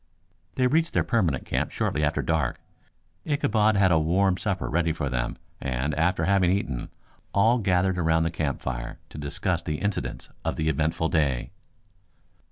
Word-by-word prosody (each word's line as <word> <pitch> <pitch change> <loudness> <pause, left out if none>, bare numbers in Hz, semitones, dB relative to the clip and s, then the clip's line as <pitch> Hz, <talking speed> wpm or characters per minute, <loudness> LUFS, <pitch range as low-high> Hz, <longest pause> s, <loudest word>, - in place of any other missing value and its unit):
They 130 - +2
reached 160 +6 +2
their - - +3
permanent 90 - 0
camp - - -1
shortly 75 - -1
after 75 +2 +1
dark. 80 -7 0 0.6
Ichabod 110 -8 +2
had 95 -2 +4
a 80 - +5
warm 90 +4 +2
supper 95 +1 -2
ready 85 0 +1
for 75 -3 -2
them, 65 -1 -2 0.2
and 65 +3 -1
after 80 +2 +1
having 95 -2 +3
eaten, 90 -10 -1 0.5
all 115 +5 +4
gathered 95 -2 +1
about 80 -1 +3
the 80 - 0
campfire 65 -6 -3
to - - -9
discuss 80 +4 -1
the 75 -3 -3
incidents 105 +3 -3
of - - -1
the 80 0 0
eventful 80 +1 0
day. 70 -6 0
85 Hz, 160 wpm, -26 LUFS, 75-100 Hz, 0.6 s, a